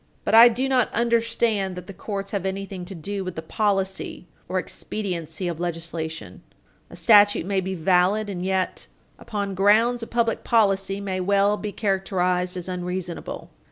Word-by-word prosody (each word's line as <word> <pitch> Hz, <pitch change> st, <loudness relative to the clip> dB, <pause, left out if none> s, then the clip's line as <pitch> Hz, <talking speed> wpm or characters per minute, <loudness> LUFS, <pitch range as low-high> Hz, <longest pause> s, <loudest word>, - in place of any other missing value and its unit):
But -, -, 0 dB
I 230 Hz, +2 st, +10 dB
do 250 Hz, +3 st, -1 dB
not 255 Hz, -3 st, +2 dB
understand 230 Hz, -4 st, +1 dB
that 180 Hz, -1 st, -8 dB
the 195 Hz, -, -9 dB
courts 195 Hz, +1 st, -5 dB
have 200 Hz, -3 st, -2 dB
anything 195 Hz, -1 st, -4 dB
to 195 Hz, +2 st, -8 dB
do 195 Hz, +4 st, -4 dB
with 185 Hz, -1 st, -6 dB
the 160 Hz, -, -5 dB
policy 195 Hz, 0 st, -1 dB, 0.2 s
or 185 Hz, -, -1 dB
expediency 180 Hz, -3 st, -4 dB
of 170 Hz, -2 st, -4 dB
legislation. 165 Hz, -2 st, -5 dB, 0.5 s
A -, -, -11 dB
statute 205 Hz, -5 st, +5 dB
may 195 Hz, 0 st, 0 dB
be 190 Hz, +1 st, -4 dB
valid 185 Hz, +5 st, +2 dB
and 185 Hz, -3 st, -4 dB
yet, 190 Hz, 0 st, -1 dB, 0.3 s
upon 205 Hz, -3 st, -4 dB
grounds 220 Hz, +5 st, +3 dB
of 230 Hz, -, -6 dB
public 230 Hz, -1 st, 0 dB
policy, 195 Hz, -3 st, +2 dB
may 190 Hz, -2 st, -3 dB
well 200 Hz, +2 st, +2 dB
be 210 Hz, 0 st, -5 dB
characterized 185 Hz, -3 st, 0 dB
as 180 Hz, -, -3 dB
unreasonable. 180 Hz, -1 st, -5 dB
195 Hz, 160 wpm, -24 LUFS, 180-210 Hz, 0.5 s, I